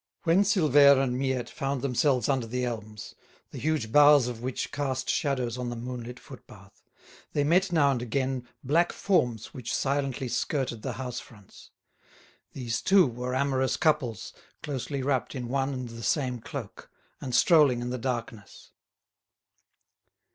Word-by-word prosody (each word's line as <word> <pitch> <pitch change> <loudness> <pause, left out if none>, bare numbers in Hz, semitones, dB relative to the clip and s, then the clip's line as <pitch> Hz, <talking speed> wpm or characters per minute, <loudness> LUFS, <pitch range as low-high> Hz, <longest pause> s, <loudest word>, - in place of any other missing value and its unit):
When 170 +3 +4
Silvère 145 - +5
and 130 -2 0
Miette 130 -1 -2
found 135 -1 -3
themselves 130 -2 +1
under 130 -4 0
the 125 +2 -2
elms, 110 -4 -6 0.4
the - - -7
huge 150 -8 -1
boughs 145 -2 +6
of 120 -2 -6
which 130 +1 -4
cast 135 -2 -2
shadows 130 -5 -1
on 125 -1 -3
the 120 - -4
moonlit 120 0 -7
footpath, - - -15 0.5
they 145 - +1
met 180 +5 +2
now 145 -5 +4
and 125 -3 -2
again 130 +1 -2 0.2
black 165 +6 +2
forms 125 - 0
which 125 -1 -6
silently 135 -1 -1
skirted 125 -3 -2
the 130 - -4
house 125 +1 -5
fronts. 105 -5 -16 0.8
These, 120 -3 -3
too, 190 -1 +5
were 125 0 -4
amorous 130 -1 0
couples, 150 - 0 0.3
closely 140 -1 -4
wrapped 135 -1 -1
in 125 -2 -5
one 135 +1 0
and 130 -2 -5
the 115 0 -9
same 125 +2 0
cloak, - - -8 0.3
and 125 -2 -3
strolling 150 -8 +5
in 120 0 -4
the 125 - -3
darkness. 115 -4 -6
130 Hz, 150 wpm, -27 LUFS, 120-140 Hz, 0.8 s, boughs